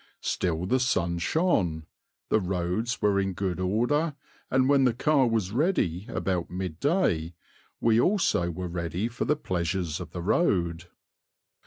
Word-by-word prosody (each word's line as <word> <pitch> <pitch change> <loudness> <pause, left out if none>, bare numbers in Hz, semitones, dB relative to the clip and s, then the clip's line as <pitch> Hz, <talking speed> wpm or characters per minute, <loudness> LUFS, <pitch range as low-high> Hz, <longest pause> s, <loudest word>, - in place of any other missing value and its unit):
Still 85 -1 -1
the 130 +8 +2
sun 85 -9 0
shone, 90 - +1 0.4
the 110 - +3
roads 95 +6 -2
were 100 -1 +3
in 95 -1 -1
good 95 -1 -2
order, 120 - +1 0.3
and 130 0 +3
when 140 -1 +4
the 125 -3 +2
car 140 0 +3
was 110 -5 0
ready 110 - 0
about 90 -6 -2
midday, 90 - -1 0.4
we 115 0 +3
also 170 - +2
were 90 +2 -4
ready 85 +4 -2
for 120 +1 -3
the 150 - +2
pleasures 85 - -2
of 90 - -7
the 85 - -6
road. 90 - +1
95 Hz, 145 wpm, -27 LUFS, 85-125 Hz, 0.4 s, when